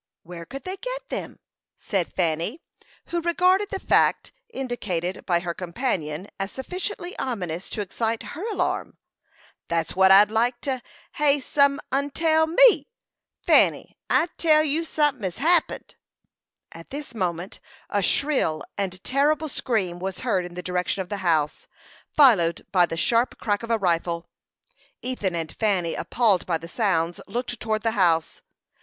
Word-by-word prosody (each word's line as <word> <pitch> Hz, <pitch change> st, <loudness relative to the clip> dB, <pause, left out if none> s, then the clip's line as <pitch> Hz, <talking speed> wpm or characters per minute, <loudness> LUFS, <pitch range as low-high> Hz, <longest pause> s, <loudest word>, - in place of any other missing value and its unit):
"Where 170 Hz, -1 st, -9 dB
could 275 Hz, -1 st, -8 dB
they 375 Hz, +1 st, -5 dB
get -, -, -6 dB
them?" -, -, -5 dB, 0.4 s
said 190 Hz, -5 st, -2 dB
Fanny, 175 Hz, -, -1 dB, 0.5 s
who 340 Hz, 0 st, -1 dB
regarded 365 Hz, +4 st, +2 dB
the 390 Hz, -, -4 dB
fact -, -, +2 dB, 0.2 s
indicated 210 Hz, -, -4 dB
by 175 Hz, -2 st, +2 dB
her 170 Hz, -1 st, -3 dB
companion 175 Hz, -, -3 dB
as 195 Hz, 0 st, -3 dB
sufficiently 360 Hz, +5 st, -5 dB
ominous 180 Hz, -8 st, -4 dB
to 210 Hz, -, -3 dB
excite 225 Hz, +3 st, -2 dB
her 330 Hz, -, -6 dB
alarm. -, -, -2 dB, 0.7 s
"That's 165 Hz, 0 st, -1 dB
what 190 Hz, 0 st, +5 dB
I'd 200 Hz, +2 st, +7 dB
like 240 Hz, +2 st, +1 dB
to 260 Hz, -3 st, -2 dB, 0.3 s
hev 290 Hz, -2 st, +2 dB
some 280 Hz, 0 st, +3 dB
'un 280 Hz, +2 st, 0 dB
tell 320 Hz, +1 st, +2 dB
me. 475 Hz, +8 st, +5 dB, 0.6 s
Fanny, -, -, +4 dB
I 340 Hz, -, +3 dB
tell 310 Hz, -2 st, +4 dB
you 310 Hz, +2 st, 0 dB
sunthin' 295 Hz, -5 st, +1 dB
hes 185 Hz, -3 st, -3 dB
happened." 335 Hz, +2 st, +1 dB, 0.8 s
At 165 Hz, 0 st, -12 dB
this 285 Hz, -3 st, -7 dB
moment 180 Hz, -3 st, -3 dB, 0.3 s
a 205 Hz, -, 0 dB
shrill 255 Hz, -, +1 dB, 0.2 s
and 185 Hz, -1 st, -3 dB
terrible 295 Hz, +3 st, +1 dB
scream 195 Hz, -10 st, -2 dB
was 190 Hz, +1 st, -5 dB
heard 200 Hz, -8 st, 0 dB
in 175 Hz, 0 st, -10 dB
the 180 Hz, -, -6 dB
direction 180 Hz, +2 st, -1 dB
of 180 Hz, -, -18 dB
the 205 Hz, -, -3 dB
house, 160 Hz, -6 st, 0 dB, 0.4 s
followed 210 Hz, -, +4 dB
by 180 Hz, -3 st, +4 dB
the 165 Hz, -, -5 dB
sharp 230 Hz, +8 st, +1 dB
crack 205 Hz, -2 st, -1 dB
of 230 Hz, -, -7 dB
a 230 Hz, -, +3 dB
rifle. 170 Hz, -3 st, -1 dB, 0.7 s
Ethan 210 Hz, -8 st, -2 dB
and 165 Hz, -2 st, -4 dB
Fanny, 190 Hz, -6 st, +1 dB
appalled 220 Hz, -6 st, +1 dB
by 170 Hz, -2 st, +1 dB
the 165 Hz, +1 st, -10 dB
sounds, 170 Hz, -4 st, 0 dB
looked 245 Hz, +4 st, -4 dB
towards 215 Hz, -1 st, -2 dB
the 225 Hz, -, +2 dB
house. 170 Hz, -7 st, +1 dB
215 Hz, 155 wpm, -24 LUFS, 175-280 Hz, 0.8 s, I'd